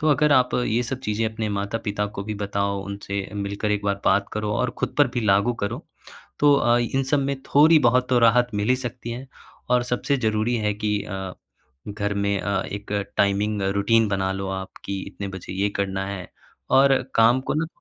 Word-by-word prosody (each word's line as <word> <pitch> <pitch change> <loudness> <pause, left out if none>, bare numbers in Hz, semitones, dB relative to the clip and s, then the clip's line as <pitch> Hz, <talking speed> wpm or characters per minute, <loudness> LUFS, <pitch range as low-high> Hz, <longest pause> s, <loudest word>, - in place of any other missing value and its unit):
तो 155 - +1
अगर 150 0 +3
आप 125 -2 +3
ये 115 +3 +1
सब 130 +2 -4
चीज़े 110 -2 -1
अपने 110 0 -3
माता-पिता 105 0 -2
को 100 -1 -7
भी 110 - -4
बताओ, 100 -1 -2
उनसे 100 0 -5
मिलकर 100 +1 -3
एक 105 0 -2
बार 100 0 -1
बात 100 +1 +3
करो 105 0 -2
और 125 +2 0
ख़ुद - - -2
पर 145 -3 +5
भी - - +2
लागू 100 +4 +3
करो, 100 - -5 0.5
तो 145 -1 +6
अ, 120 -2 +3
इन 120 +3 0
सब 140 +2 +1
में 140 0 -2
थोड़ी 155 +3 +5
बहुत 125 +1 +1
तो 125 - +4
राहत 120 +2 +4
मिल 105 +2 -1
ही 130 - +4
सकती 120 -1 -6
है। 125 +3 -6 0.4
और 125 -1 +4
सबसे 140 +3 +1
ज़रूरी 110 -1 0
है 105 -2 0
कि 105 -1 -1
अ, 95 -2 -5 0.6
घर 100 0 -2
में 100 0 0
अ, 95 0 -1
एक 100 0 -7 0.3
टाइमिंग 100 +1 +1
रूटीन 115 +3 +3
बना 95 -1 0
लो 95 0 -4
आप 95 0 -5
की 100 0 -3
इतने 100 - -7
बजे 95 -2 -8
ये 100 +2 +1
करना 95 -1 -2
है। 95 -3 -5 0.4
और 135 +1 +5 0.2
काम 115 +3 +5
को - - -3
ना 160 +1 0
105 Hz, 205 wpm, -23 LUFS, 100-125 Hz, 0.6 s, तो